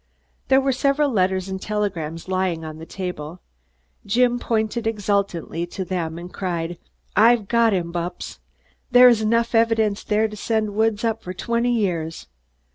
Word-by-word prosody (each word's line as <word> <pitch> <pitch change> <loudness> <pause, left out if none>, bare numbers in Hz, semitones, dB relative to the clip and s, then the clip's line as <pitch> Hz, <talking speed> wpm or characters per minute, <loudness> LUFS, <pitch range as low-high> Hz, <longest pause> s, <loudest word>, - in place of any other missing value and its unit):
There 265 0 +5
were 270 0 +1
several 275 +2 +1
letters 190 -3 +1
and 190 0 -5
telegrams 175 -7 -3
lying 185 -3 -1
on 155 0 -8
the 160 - -9
table. 180 -3 -6 0.6
Jim 245 +4 +2
pointed 225 0 -1
exultantly 200 -5 -1
to 190 +2 -5
them 170 -3 -3
and 175 +1 -9
cried: 175 -2 -3 0.4
"I've 225 0 +5
got 235 0 +3
him, 175 -4 -1
Bupps! 175 +1 -5 0.5
There 250 0 +8
is 230 -3 +3
enough 230 +2 +1
evidence 225 -2 +2
there 215 +1 +1
to 210 - -9
send 215 0 -1
Woods 220 0 +1
up 225 -1 0
for 180 +1 -7
twenty 235 +4 0
years. 175 -8 -1
205 Hz, 155 wpm, -22 LUFS, 180-230 Hz, 0.6 s, There